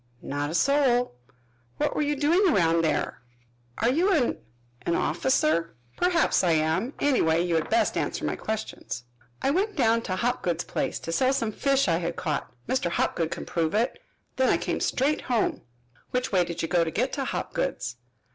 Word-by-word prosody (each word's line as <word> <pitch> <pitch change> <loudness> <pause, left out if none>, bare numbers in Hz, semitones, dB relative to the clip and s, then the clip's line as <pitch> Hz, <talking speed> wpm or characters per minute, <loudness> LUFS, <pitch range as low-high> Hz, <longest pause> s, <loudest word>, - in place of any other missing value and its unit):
"Not 145 +1 -2
a 160 - -3
soul." 250 - +3 0.6
"What - - 0
were - - +1
you 295 0 +1
doing 335 +7 +3
around 165 - +3
there?" 155 - -1 0.6
"Are 230 +3 +2
you 350 +9 +2
an 300 -10 +1 0.4
an 170 - 0
officer?" 260 - +1 0.2
"Perhaps 355 - +2
I 175 -2 +3
am. 160 - 0
Anyway, 170 - +3
you 175 - -1
had 160 -1 0
best 345 - +2
answer - - -2
my - - -1
questions." 215 - -5 0.4
"I 275 - +3
went 395 +6 0
down 230 -5 +3
to 185 -5 -3
Hopgood's 185 -6 -1
place, - - -2
to 165 - -5
sell 260 +9 +2
some 230 -5 0
fish 275 +3 +1
I 165 -2 +3
had 170 -1 -3
caught 155 -5 -3 0.2
Mr. 260 -9 0
Hopgood 165 -1 0
can 175 - -5
prove 165 +1 -1
it. 235 +4 0 0.4
Then 260 0 +3
I - - +4
came - - -2
straight 285 +4 +1
home." 240 -3 0 0.5
"Which 250 0 -1
way 180 -3 +3
did 170 0 -4
you - - 0
go 170 0 +3
to 165 - -2
get - - -1
to - - -2
Hopgood's?" 120 0 -3
220 Hz, 185 wpm, -26 LUFS, 165-275 Hz, 0.6 s, I